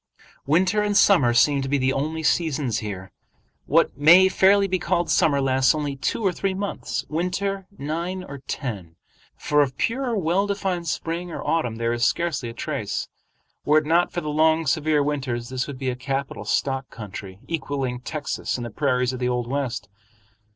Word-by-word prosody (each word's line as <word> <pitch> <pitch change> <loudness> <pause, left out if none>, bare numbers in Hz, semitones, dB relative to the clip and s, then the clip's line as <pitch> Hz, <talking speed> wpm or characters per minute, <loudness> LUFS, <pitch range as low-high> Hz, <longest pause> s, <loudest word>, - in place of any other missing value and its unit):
Winter 185 +7 +3
and 205 -1 +1
summer 185 -12 +5
seem 140 +4 +3
to 135 - -3
be 145 - +2
the 130 0 +1
only 155 +3 -2
seasons 150 -8 +1
here. 95 -3 -6 0.6
What - - +3
may 170 +7 +7
fairly 195 +1 +4
be 185 -1 0
called 175 -1 0
summer 140 -3 +3
lasts 130 +1 +3
only 145 -2 -2
two 200 +10 -2
or 190 - +4
three 190 +2 -2
months, 200 +1 -3
winter 185 +4 -2
nine 170 +6 -3
or 140 -6 -8
ten, 100 - -5 0.4
for 150 0 +2
of 130 -3 -1
pure 245 -1 -1
well 185 +3 +1
defined 190 -4 -2
spring 170 +2 -3
or - - -6
autumn 155 -9 0
there 115 +1 -1
is 120 0 -2
scarcely 155 -8 0
a - - -8
trace. - - -3 0.5
Were 150 +1 +4
it 155 - +2
not 170 +3 +2
for 175 - -3
the 150 - -4
long 160 +2 +3
severe 150 0 +2
winters, 130 -5 -2
this 130 -1 -2
would 140 -3 -7
be 130 -1 -2
a - - -4
capital 135 +1 -4
stock 135 -1 -1
country, 100 -3 -9
equaling 135 -5 -3
Texas 150 +1 -3
and 120 - -5
the 120 - -6
prairies 125 -1 0
of 130 - -5
the 125 -1 0
old 125 -1 -1
West. 125 -6 -3
150 Hz, 185 wpm, -24 LUFS, 130-175 Hz, 0.6 s, may